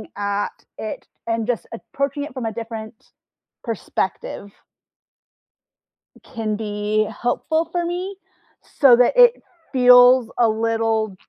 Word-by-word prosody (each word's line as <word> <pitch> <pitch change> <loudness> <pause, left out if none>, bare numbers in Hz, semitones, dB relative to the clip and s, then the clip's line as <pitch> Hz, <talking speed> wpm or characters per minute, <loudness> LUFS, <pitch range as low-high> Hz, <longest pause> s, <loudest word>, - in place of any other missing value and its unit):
at 205 0 -3
it 215 - -7 0.2
and 230 -1 -1
just 245 -2 -2
approaching 280 +4 -4
it 290 - -8
from 255 -3 -5
a 225 - -3
different 220 -1 -8 0.5
perspective 200 -2 -4 1.7
can 220 -4 -4
be 210 0 -1
helpful 315 +7 0
for 345 0 -1
me, 360 +3 -4 0.6
so 270 -5 +8
that 245 0 +3
it - - +6 0.3
feels 250 -1 +6
a 235 -2 +4
little 225 -2 -1
230 Hz, 110 wpm, -21 LUFS, 220-260 Hz, 1.7 s, so